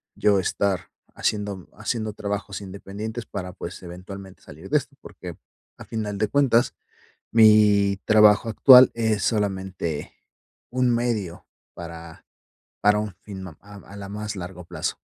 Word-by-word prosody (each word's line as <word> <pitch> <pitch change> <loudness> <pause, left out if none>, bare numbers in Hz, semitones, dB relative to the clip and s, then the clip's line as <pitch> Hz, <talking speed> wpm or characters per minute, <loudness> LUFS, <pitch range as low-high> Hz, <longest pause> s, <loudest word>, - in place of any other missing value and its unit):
yo 100 -2 +3
estar 95 0 -1 0.2
haciendo 100 -3 -2
haciendo 110 +1 -3
trabajos 100 -1 -4
independientes 100 +4 -7
para 90 -2 -6
pues, 90 0 -8
eventualmente 95 +2 -10
salir - - -12
de - - +4
esto, - - -5
porque, - - -10 0.4
a - - -11
final 105 -2 -4
de 110 - +1
cuentas, 125 -1 +3 0.6
mi 105 -3 +5
trabajo 105 +1 +5
actual 130 +2 +8
es 110 -3 0
solamente 95 -7 -2 0.6
un 125 0 +1
medio 110 -8 -2 0.3
para 85 -1 -10 0.6
para 105 +1 +4
un 105 -3 -5
fin 95 -2 -8
a 80 - -14 0.2
a 100 0 -13
la 100 -1 -8
más 105 0 -5
largo 90 -1 -7
plazo. - - -4
100 Hz, 135 wpm, -24 LUFS, 95-110 Hz, 0.6 s, actual